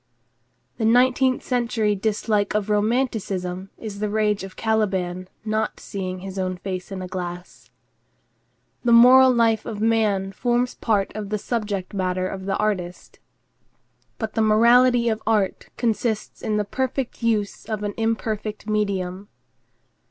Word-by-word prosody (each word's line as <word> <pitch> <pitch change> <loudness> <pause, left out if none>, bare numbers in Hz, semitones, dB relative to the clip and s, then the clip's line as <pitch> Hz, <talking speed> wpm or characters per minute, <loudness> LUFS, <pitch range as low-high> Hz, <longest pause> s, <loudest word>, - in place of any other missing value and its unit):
The 225 - -1
nineteenth 255 +2 +3
century 235 -4 0
dislike 210 0 0
of 210 0 0
romanticism 205 -5 -1
is 210 -3 -7
the 210 0 -1
rage 210 -1 +1
of 195 -1 -9
Caliban 190 -5 -1 0.2
not 215 0 -1
seeing 185 -2 -5
his 195 0 -6
own 185 -1 -2
face 185 0 -5
in 190 -1 -5
a - - -5
glass. 180 -1 -7 1.1
The 240 -1 +3
moral 255 +2 +8
life 230 -3 +2
of 215 -2 -6
man 210 -3 +1
forms 245 +4 0
part 205 -4 0
of 210 -2 -5
the 210 - 0
subject 205 -4 -3
matter 185 -1 -1
of 190 0 -6
the 195 - 0
artist, 185 -4 -3 1.0
but 220 -1 -4
the 225 - +1
morality 235 +3 +5
of 220 -1 0
art 210 -4 0
consists 225 -2 -1
in 215 -2 -1
the 210 - 0
perfect 260 +3 -3
use 215 -3 -1
of 215 -2 -4
an 205 0 -2
imperfect 220 -2 -2
medium. 200 -2 -1
210 Hz, 140 wpm, -23 LUFS, 195-230 Hz, 1.1 s, moral